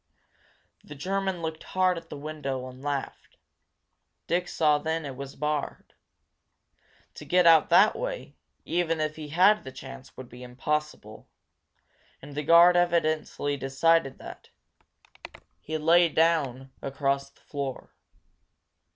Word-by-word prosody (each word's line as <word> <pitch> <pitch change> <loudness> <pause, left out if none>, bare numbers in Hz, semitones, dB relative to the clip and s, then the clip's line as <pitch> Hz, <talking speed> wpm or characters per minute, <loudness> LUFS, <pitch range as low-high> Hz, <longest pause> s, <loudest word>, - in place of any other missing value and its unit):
The 150 - -11
German 190 +3 -2
looked 160 0 -4
hard 185 -1 +1
at 165 - -9
the - - -7
window 140 -3 -5
and 130 0 -12
laughed. 145 -1 -5 0.9
Dick 175 +1 -1
saw 150 -3 +2
then 160 +2 -2
that 145 - -5
it 135 - -8
was 140 +1 -8
barred. 150 0 -3 1.2
To - - -10
get 180 0 +2
out 165 -2 +6
that 195 +5 +5
way, - - -5 0.3
even 165 -2 0
if 155 0 -2
he 155 -1 -8
had 185 +8 +4
the 130 - -8
chance, 135 0 -11
would 130 - -9
be 125 +1 -13
impossible. 150 +5 -4 0.9
And 145 +1 -12
the 145 - -3
guard 170 +3 +6
evidently 155 -4 0
decided 135 +2 +1
that. - - -11 1.1
He 155 +1 -4
lay 165 +2 +4
down 145 -6 +1
across 140 0 -1
the - - -29
door. 140 -3 -5
155 Hz, 135 wpm, -27 LUFS, 140-170 Hz, 1.2 s, out